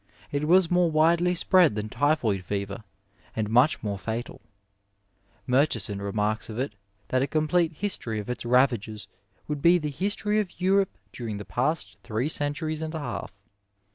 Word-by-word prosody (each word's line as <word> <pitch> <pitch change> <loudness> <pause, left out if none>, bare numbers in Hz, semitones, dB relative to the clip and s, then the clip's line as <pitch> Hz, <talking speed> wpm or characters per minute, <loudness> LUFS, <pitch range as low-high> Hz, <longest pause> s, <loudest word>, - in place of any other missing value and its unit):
It 145 +1 -1
was 180 0 +5
more 175 -1 +4
widely 170 +3 +3
spread 175 - +4
than 105 0 -3
typhoid 115 -6 +1
fever 100 +2 -4 0.5
and 110 -1 -2
much 125 +5 +4
more 100 -2 -3
fatal 115 +3 -5 1.0
Murchison 120 -7 +1
remarks 105 +3 -1
of 110 - -6
it 130 -2 -2 0.4
that 130 - +2
a 135 - +1
complete 160 +2 +1
history 145 - -2
of 105 - -6
its 125 - -4
ravages 120 -4 +1 0.4
would 150 -2 -3
be 170 +3 +6
the 150 -3 -3
history 205 +6 0
of 195 -5 -4
Europe 195 +1 +2 0.2
during 115 -4 -5
the 105 - -7
past 155 +6 -1
three 120 +5 -2
centuries 155 +1 -1
and 160 0 -4
a - - -2
half. 145 - -6
140 Hz, 160 wpm, -26 LUFS, 110-165 Hz, 1.0 s, be